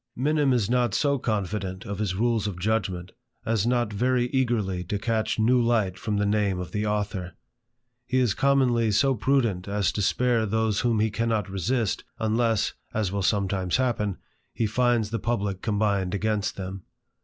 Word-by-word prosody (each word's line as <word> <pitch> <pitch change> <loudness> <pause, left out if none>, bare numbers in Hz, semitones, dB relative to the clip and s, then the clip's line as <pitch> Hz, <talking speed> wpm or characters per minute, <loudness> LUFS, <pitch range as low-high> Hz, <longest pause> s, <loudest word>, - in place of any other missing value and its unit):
Minim 145 +1 +2
is 120 -6 +2
not 120 -2 +1
so 140 +3 +2
confident 100 -4 -3
of 100 0 -5
his 100 -4 -1
rules 115 0 +1
of 100 -4 -4
judgment 95 -3 -1 0.3
as 115 -1 +1
not 120 -3 +1
very 125 +3 +1
eagerly 115 -9 0
to 100 +4 -2
catch 110 +1 -1
new 120 +3 +3
light 110 -6 +1
from 105 +2 -2
the 105 - +1
name 100 -2 +1
of 90 -2 -6
the 105 0 -1
author. 100 -4 -2 0.7
He 125 - 0
is 125 -6 +3
commonly 130 -5 +2
so 135 +6 +3
prudent 115 -6 0
as 100 -1 +1
to 105 - -3
spare 115 +2 +2
those 110 0 +1
whom 115 -3 +1
he 110 0 +1
cannot 110 -3 -1
resist, 110 +3 -1
unless, 110 -1 +1 0.2
as 105 -4 0
will 100 0 -1
sometimes 95 -1 +1
happen, 115 -6 0 0.4
he 115 - 0
finds 115 -1 +1
the 115 - -1
publick 100 -4 -2
combined 100 -3 0
against 105 0 -1
them. 95 0 -6
110 Hz, 170 wpm, -26 LUFS, 100-120 Hz, 0.7 s, new